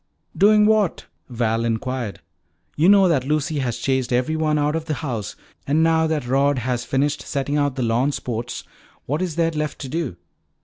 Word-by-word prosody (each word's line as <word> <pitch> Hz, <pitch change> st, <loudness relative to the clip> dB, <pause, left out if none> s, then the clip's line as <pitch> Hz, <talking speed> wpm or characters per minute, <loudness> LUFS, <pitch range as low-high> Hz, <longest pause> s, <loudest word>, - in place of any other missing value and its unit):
"Doing 210 Hz, +1 st, +5 dB
what?" 215 Hz, -4 st, +2 dB, 0.2 s
Val 115 Hz, -2 st, 0 dB
inquired. 115 Hz, -1 st, -3 dB, 0.5 s
"You 165 Hz, +5 st, +4 dB
know 200 Hz, -2 st, +6 dB
that 150 Hz, -7 st, +2 dB
Lucy 150 Hz, 0 st, 0 dB
has 120 Hz, -3 st, -2 dB
chased 130 Hz, +1 st, -1 dB
everyone 155 Hz, +5 st, +1 dB
out 150 Hz, +1 st, +1 dB
of 160 Hz, -1 st, -3 dB
the 155 Hz, -, -2 dB
house. 120 Hz, -8 st, -4 dB, 0.3 s
And 150 Hz, +3 st, +3 dB
now 160 Hz, 0 st, +3 dB
that 155 Hz, -5 st, -1 dB
Rod 135 Hz, +2 st, +2 dB
has 125 Hz, 0 st, -2 dB
finished 140 Hz, +3 st, 0 dB
setting 140 Hz, 0 st, -2 dB
out 145 Hz, -2 st, +1 dB
the 130 Hz, -, -1 dB
lawn 120 Hz, +5 st, +1 dB
sports, 120 Hz, -3 st, -4 dB, 0.4 s
what 150 Hz, +6 st, -2 dB
is 180 Hz, -4 st, -2 dB
there 165 Hz, -1 st, +1 dB
left 150 Hz, -2 st, -3 dB
to 135 Hz, -, -6 dB
do? 155 Hz, -, -3 dB
145 Hz, 180 wpm, -22 LUFS, 125-160 Hz, 0.5 s, know